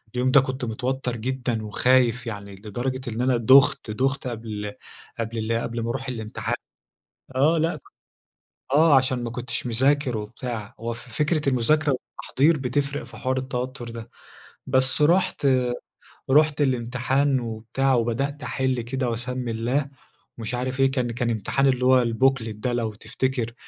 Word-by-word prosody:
اليوم 125 Hz, +1 st, +2 dB
ده 140 Hz, -, +7 dB
كنت 130 Hz, 0 st, -3 dB
متوتر 125 Hz, +2 st, -2 dB
جدًا 125 Hz, -1 st, -2 dB
وخايف 125 Hz, +2 st, +2 dB
يعني، 100 Hz, -3 st, -6 dB
لدرجة 120 Hz, +6 st, -4 dB
إن 115 Hz, +2 st, -3 dB
أنا 125 Hz, -1 st, +3 dB
دُخت، 130 Hz, -1 st, +5 dB
دُخت 135 Hz, +4 st, -1 dB
قبل 110 Hz, -3 st, -5 dB, 0.5 s
قبل 115 Hz, 0 st, -3 dB
ال 115 Hz, +1 st, 0 dB
قبل 115 Hz, 0 st, -3 dB
ما 115 Hz, -, -2 dB
أروح 130 Hz, +2 st, -3 dB
الامتحان 110 Hz, -1 st, -3 dB, 0.8 s
آه، 155 Hz, +5 st, +4 dB
لأ 165 Hz, +2 st, 0 dB, 1.0 s
آه، 155 Hz, -1 st, +6 dB
عشان 130 Hz, -1 st, +2 dB
ما 115 Hz, -, -3 dB
كنتش 120 Hz, 0 st, -4 dB
مذاكر 130 Hz, +2 st, +2 dB
وبتاع. 110 Hz, 0 st, -6 dB
هو 115 Hz, +1 st, -3 dB
ف 115 Hz, -, -6 dB, 0.2 s
فكرة 150 Hz, -1 st, +1 dB
المذاكرة 145 Hz, +4 st, +3 dB
والتحضير 145 Hz, +4 st, 0 dB
بتفرق 140 Hz, +2 st, -1 dB
في -, -, -13 dB
حوار 130 Hz, 0 st, -1 dB
التوتر 130 Hz, -1 st, -4 dB
ده. 115 Hz, 0 st, -8 dB, 0.6 s
بس 130 Hz, +2 st, +2 dB
رُحت 170 Hz, -2 st, +3 dB, 0.9 s
رُحت 150 Hz, +1 st, +4 dB
الامتحان 130 Hz, +2 st, +1 dB
وبتاع، 115 Hz, +3 st, -1 dB
وبدأت 135 Hz, +5 st, -1 dB
أحِل 130 Hz, -2 st, -1 dB
كده 125 Hz, +1 st, -2 dB
وأسمّي 125 Hz, +1 st, -3 dB
الله 125 Hz, +6 st, -1 dB, 0.5 s
ومش 115 Hz, +2 st, -3 dB
عارف 130 Hz, +2 st, -3 dB
إيه، 135 Hz, 0 st, +4 dB
كان 125 Hz, -3 st, -1 dB
كان 120 Hz, 0 st, -1 dB
امتحان 115 Hz, +5 st, +1 dB
اللي 125 Hz, -1 st, +2 dB
هو 130 Hz, -1 st, +5 dB
الbooklet 115 Hz, 0 st, +2 dB
ده 120 Hz, +4 st, -2 dB
لو 115 Hz, -3 st, -1 dB
تفتكر. 120 Hz, +1 st, -2 dB
125 Hz, 150 wpm, -24 LUFS, 115-135 Hz, 1.0 s, ده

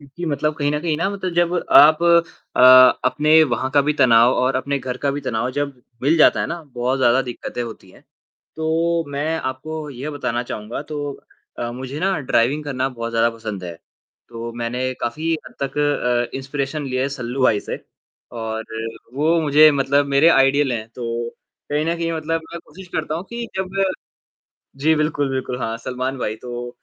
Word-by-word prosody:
क्योंकि 145 Hz, +5 st, -9 dB
मतलब 150 Hz, +1 st, 0 dB
कहीं 145 Hz, -1 st, 0 dB
न 150 Hz, -, 0 dB
कहीं 160 Hz, -2 st, -1 dB
ना 170 Hz, +4 st, 0 dB
मतलब 190 Hz, -3 st, -4 dB
जब 175 Hz, 0 st, +2 dB, 0.2 s
आप 155 Hz, +3 st, +7 dB, 0.5 s
अ, -, -, +3 dB, 0.4 s
अपने 155 Hz, +4 st, +4 dB
वहाँ 130 Hz, +2 st, -1 dB
का 145 Hz, -, +4 dB
भी 150 Hz, +1 st, +1 dB
तनाव 120 Hz, -1 st, +6 dB
और 130 Hz, +1 st, +1 dB
अपने 140 Hz, +1 st, -1 dB
घर 125 Hz, -1 st, -5 dB
का 140 Hz, -, +3 dB
भी 145 Hz, +1 st, -3 dB
तनाव 125 Hz, -2 st, -2 dB
जब 140 Hz, -1 st, -4 dB, 0.2 s
मिल 155 Hz, +5 st, +3 dB
जाता 155 Hz, -, +5 dB
है -, -, 0 dB
ना, 170 Hz, -1 st, -5 dB
बहुत 130 Hz, -1 st, -2 dB
ज़्यादा 125 Hz, +1 st, +3 dB
दिक्कतें 120 Hz, -1 st, -5 dB
होती 110 Hz, -5 st, -9 dB
हैं, -, -, -19 dB, 0.5 s
तो 165 Hz, +1 st, 0 dB
मैं 150 Hz, +3 st, -1 dB
आपको 150 Hz, +4 st, -5 dB
यह 135 Hz, +4 st, -6 dB
बताना 125 Hz, -4 st, -2 dB
चाहूँगा 110 Hz, +6 st, -5 dB
तो 145 Hz, -1 st, -3 dB, 0.5 s
अ, 120 Hz, 0 st, -3 dB
मुझे 130 Hz, +4 st, -6 dB
ना 190 Hz, -2 st, +1 dB
ड्राइविंग 135 Hz, +3 st, +1 dB
करना 135 Hz, -2 st, -1 dB
बहुत 115 Hz, -2 st, -5 dB
ज़्यादा 115 Hz, 0 st, +2 dB
पसंद 105 Hz, -4 st, -6 dB
है, 85 Hz, -1 st, -6 dB, 0.5 s
तो 115 Hz, 0 st, -7 dB
मैंने 125 Hz, +2 st, -2 dB
काफ़ी 155 Hz, +7 st, -2 dB
हद -, -, -13 dB
तक 135 Hz, +1 st, -3 dB, 0.5 s
अ, -, -, -4 dB
इंस्पिरेशन 140 Hz, +2 st, -4 dB
ली 130 Hz, -1 st, -3 dB
है 135 Hz, +2 st, 0 dB
सल्लू 125 Hz, +2 st, -3 dB
भाई 110 Hz, -5 st, +3 dB
से -, -, -6 dB, 0.6 s
और 110 Hz, -1 st, -4 dB, 0.5 s
वो 160 Hz, +4 st, +2 dB
मुझे 155 Hz, 0 st, +6 dB
मतलब 140 Hz, +1 st, +2 dB
मेरे 140 Hz, +3 st, +4 dB
आइडल 135 Hz, -2 st, +4 dB
हैं, 110 Hz, -2 st, -4 dB
तो 115 Hz, 0 st, -4 dB, 0.4 s
कहीं 150 Hz, +1 st, 0 dB
न 170 Hz, +1 st, 0 dB
कहीं 165 Hz, 0 st, -2 dB
मतलब 165 Hz, +1 st, -2 dB
मैं 170 Hz, -, -5 dB
कोशिश 190 Hz, -1 st, -13 dB
करता 155 Hz, 0 st, -2 dB
हूँ 170 Hz, +4 st, -4 dB
कि 235 Hz, 0 st, -4 dB
जब 190 Hz, -, -1 dB
मैं 195 Hz, -, +4 dB, 1.0 s
जी 160 Hz, +3 st, +3 dB
बिल्कुल, 150 Hz, -2 st, 0 dB
बिल्कुल। 130 Hz, -1 st, -3 dB
हाँ, 115 Hz, -1 st, -3 dB
सलमान 130 Hz, +2 st, -4 dB
भाई 110 Hz, -3 st, -3 dB
तो 120 Hz, +1 st, -7 dB
135 Hz, 190 wpm, -21 LUFS, 125-155 Hz, 1.0 s, आप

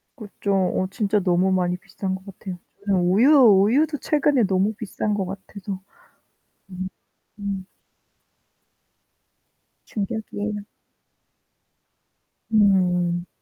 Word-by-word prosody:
그죠. 205 Hz, -4 st, -5 dB
어 185 Hz, 0 st, +1 dB
진짜 210 Hz, -1 st, +1 dB
너무 185 Hz, 0 st, +2 dB
많이 180 Hz, -1 st, +1 dB
비싼 190 Hz, 0 st, -4 dB
것 190 Hz, -, -11 dB
같아요. 190 Hz, -2 st, -8 dB, 0.3 s
저는 195 Hz, -3 st, +2 dB
우유 195 Hz, +10 st, +4 dB
우유도 255 Hz, +5 st, +5 dB
최근에 290 Hz, -5 st, +2 dB
너무 195 Hz, +2 st, +1 dB
비싼 215 Hz, -1 st, -3 dB
것 200 Hz, -2 st, -1 dB
같아서. 195 Hz, 0 st, -7 dB, 1.6 s
음 205 Hz, -, -7 dB
음. 195 Hz, -2 st, -3 dB, 2.2 s
충격이에요 210 Hz, -1 st, -4 dB, 1.9 s
음. 180 Hz, -4 st, +3 dB
195 Hz, 185 characters per minute, -23 LUFS, 185-215 Hz, 2.2 s, 우유도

